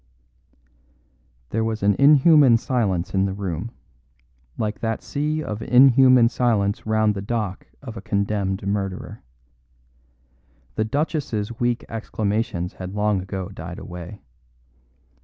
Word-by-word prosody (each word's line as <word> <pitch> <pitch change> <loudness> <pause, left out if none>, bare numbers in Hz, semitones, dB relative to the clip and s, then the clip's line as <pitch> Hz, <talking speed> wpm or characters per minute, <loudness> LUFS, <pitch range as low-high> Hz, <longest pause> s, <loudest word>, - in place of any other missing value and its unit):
There 110 +1 0
was 110 -2 -3
an 100 0 +4
inhuman 145 -3 +6
silence 100 -7 -1
in 95 0 +2
the 95 - -2
room, 95 0 -4 0.9
like 105 -1 -3
that 115 -1 -3
sea 150 +2 -2
of 105 -4 -5
inhuman 130 0 +6
silence 110 -5 0
round 110 -1 +2
the 100 - -5
dock 105 -2 -3 0.2
of 120 -5 -7
the 110 - -8
condemned 100 -1 -2
murderer. 100 -2 -3 1.5
The 110 - -1
Duchess's 120 -5 -2
weak 120 0 0
exclamations 105 -4 -3
had 95 +1 -8
long 105 -2 +1
ago 95 0 -5
died 90 -2 -8
away. 90 +3 -9
105 Hz, 120 wpm, -22 LUFS, 100-120 Hz, 1.5 s, inhuman